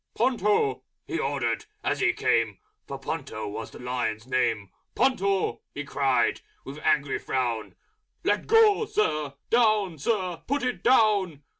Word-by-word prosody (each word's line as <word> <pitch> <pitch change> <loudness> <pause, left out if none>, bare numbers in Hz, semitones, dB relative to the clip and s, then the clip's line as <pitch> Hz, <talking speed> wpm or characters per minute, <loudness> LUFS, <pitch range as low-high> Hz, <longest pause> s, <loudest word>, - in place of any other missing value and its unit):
"Ponto!" 205 - +1 0.2
he 165 - -3
ordered 135 -6 -1 0.2
as - - 0
he - - +3
came - - +1 0.3
(For - - -5
Ponto 110 -1 -5
was 105 +2 -6
the - - -12
Lion's 125 -3 -3
name), 115 -6 0 0.2
"Ponto!" 195 -7 +1
he 145 - -3
cried, 135 -2 +1 0.2
with 140 +2 -8
angry 145 -2 +1
Frown. 120 -4 -2 0.5
"Let - - 0
go, 445 -1 +5
Sir! 155 - -1 0.2
Down, 215 -8 +3
Sir! 185 -1 -1
Put 280 0 0
it 250 -1 -2
down!" 205 - +3
150 Hz, 135 wpm, -26 LUFS, 130-215 Hz, 0.5 s, go